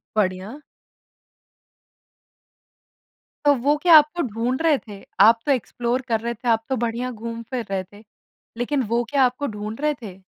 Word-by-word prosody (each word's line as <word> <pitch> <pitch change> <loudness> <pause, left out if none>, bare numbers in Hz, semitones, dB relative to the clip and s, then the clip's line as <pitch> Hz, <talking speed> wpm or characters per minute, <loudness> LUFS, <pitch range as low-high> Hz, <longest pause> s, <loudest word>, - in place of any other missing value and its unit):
बढ़िया। 200 +5 -1 2.9
तो 290 - +6
वो 280 +4 +1
क्या 335 +2 +6
आपको 305 +3 +3
ढूँढ़ 245 +2 -2
रहे 320 -3 +3
थे? 205 -5 -12 0.2
आप 225 +3 +7
तो 290 - +2
एक्सप्लोर 245 -1 -1
कर 225 -2 +1
रहे 235 +1 -2
थे, 235 +2 -9
आप 225 -1 +2
तो 265 - +1
बढ़िया 240 +2 -2
घूम-फ़िर 230 +1 -6
रहे 195 -1 -2
थे। 205 +3 -17 0.5
लेक़िन 260 +3 0
वो 235 +2 +1
क्या 280 -2 +3
आपको 255 +3 -2
ढूँढ़ 210 +1 -6
रहे 300 0 +2
थे? 195 -4 -9
235 Hz, 155 wpm, -22 LUFS, 220-270 Hz, 2.9 s, आप